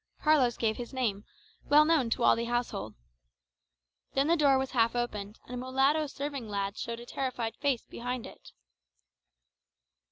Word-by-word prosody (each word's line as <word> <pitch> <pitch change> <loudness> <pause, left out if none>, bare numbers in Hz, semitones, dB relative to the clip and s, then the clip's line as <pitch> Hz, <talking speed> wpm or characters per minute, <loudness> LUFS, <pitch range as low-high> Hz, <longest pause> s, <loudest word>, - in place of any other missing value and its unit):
Carlos 285 -6 +4
gave 220 -2 0
his 245 +2 -7
name, 215 -5 -1 0.4
well 300 +1 +6
known 305 -7 +3
to 230 - 0
all - - +6
the 235 - -2
household. 240 - -2 1.2
Then 275 +1 +3
the 335 - +4
door 285 -4 +4
was 265 0 -2
half 230 -2 +2
opened, 215 -3 -3
and 250 - -10
a - - -3
mulatto 270 +4 +2
serving 275 -4 -5
lad 200 0 -2
showed 235 +1 -5
a 240 - -10
terrified 245 -3 -3
face 280 -5 0
behind 245 0 -5
it. - - -13
245 Hz, 160 wpm, -30 LUFS, 230-275 Hz, 1.2 s, well